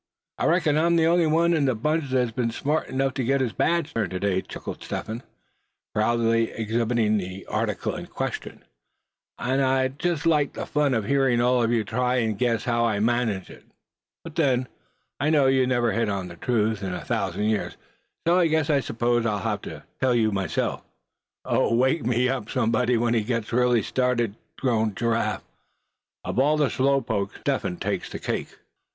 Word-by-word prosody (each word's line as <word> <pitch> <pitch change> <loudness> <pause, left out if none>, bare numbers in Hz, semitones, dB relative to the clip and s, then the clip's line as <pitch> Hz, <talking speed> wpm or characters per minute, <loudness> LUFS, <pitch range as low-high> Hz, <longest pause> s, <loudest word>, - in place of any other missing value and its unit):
"I - - +1
reckon 160 -3 +3
I'm 170 +1 +3
the 165 -1 +4
only 170 0 +3
one 165 +2 +3
in 155 -4 +2
the 130 -3 +1
bunch 150 +5 -1
that's 125 -2 +1
been 115 0 -1
smart 145 +7 -1
enough 135 0 0
to 135 - -2
get 135 +3 +2
his 125 -4 -1
badge 165 -2 0
turned 110 -5 -1
to 90 - -4
day," 95 -1 +1
chuckled - - -8
Step - - -4
Hen, 110 +2 -5 0.7
proudly 115 +1 +2
exhibiting 115 -1 0
the 95 0 -7
article - - -2
in - - -7
question; - - -5 0.7
"and 130 +2 0
I'd 130 +1 +1
just 170 -3 -1
like 150 -4 +2
the - - -5
fun 145 -3 +1
of 110 -3 -1
hearing 135 -1 +2
all 125 +1 +3
of 115 0 +1
you 115 -2 +2
try 125 +4 0
and 110 -4 0
guess 115 +1 0
how 120 -2 +1
I 110 -3 +1
managed 115 -4 0
it; - - -14 0.6
but 165 - -9
then, 130 -6 +2 0.5
I 145 +2 +1
know 150 -3 +4
you'd 130 -1 +3
never 120 -2 +2
hit 115 +1 0
on 95 -3 -3
the 85 - -10
truth 110 +1 0
in 95 -2 -3
a - - -7
thousand - - -1
years; 110 -1 -1 0.5
and 170 0 +4
so 150 -1 +1
I - - +3
s'pose 120 -1 0
I'll 105 -2 0
have 100 - -2
to - - -7
up - - -13
and - - -37
tell 130 -2 +2
you." 110 -3 +2 1.1
"Oh! 115 - +2
wake 130 +6 +2
me 125 +1 +2
up, 125 -4 -2
somebody, 120 0 +1
when 115 0 +1
he 115 - +2
gets 115 0 -3
really 125 -2 +3
started," 125 -4 0 0.2
groaned 110 -5 0
Giraffe; 115 0 0 0.8
"of - - -2
all 150 +3 +3
the 145 -3 +2
slow 135 +1 +2
pokes, 110 -5 -3
Step - - 0
Hen 90 - -4
takes - - -3
the - - -4
cake." - - -4
120 Hz, 195 wpm, -25 LUFS, 110-135 Hz, 1.1 s, the